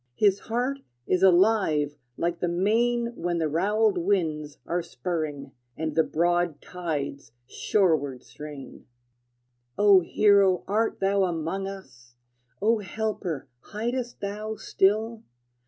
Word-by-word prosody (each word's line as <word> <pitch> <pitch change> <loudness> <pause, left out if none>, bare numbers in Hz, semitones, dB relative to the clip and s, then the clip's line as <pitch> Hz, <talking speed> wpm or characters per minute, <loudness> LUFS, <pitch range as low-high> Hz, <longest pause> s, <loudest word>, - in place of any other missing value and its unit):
His 200 +2 +3
heart 250 +4 -2 0.3
is 185 - +1
alive 180 -6 +4 0.2
like 170 0 -1
the 175 - 0
main 235 +7 +1
When 175 0 -2
the 160 -2 +1
roweled 200 +5 +2
winds 160 -6 -1
are 175 +1 -1
spurring, 160 -4 -4 0.3
And 155 -1 -2
the 160 - +4
broad 175 -2 0
tides 145 -8 -5
shoreward 145 - 0
strain. 150 -2 -10 0.9
O 205 -2 +7
hero, 195 0 +3
art 215 +2 0
thou 195 0 +3
among 175 +3 -2
us? 125 -11 -11 0.5
O 225 +1 +3
helper, 195 -7 -3
hidest 240 - -4
thou 210 +2 -4
still? 220 +3 +1
185 Hz, 115 wpm, -26 LUFS, 160-210 Hz, 0.9 s, O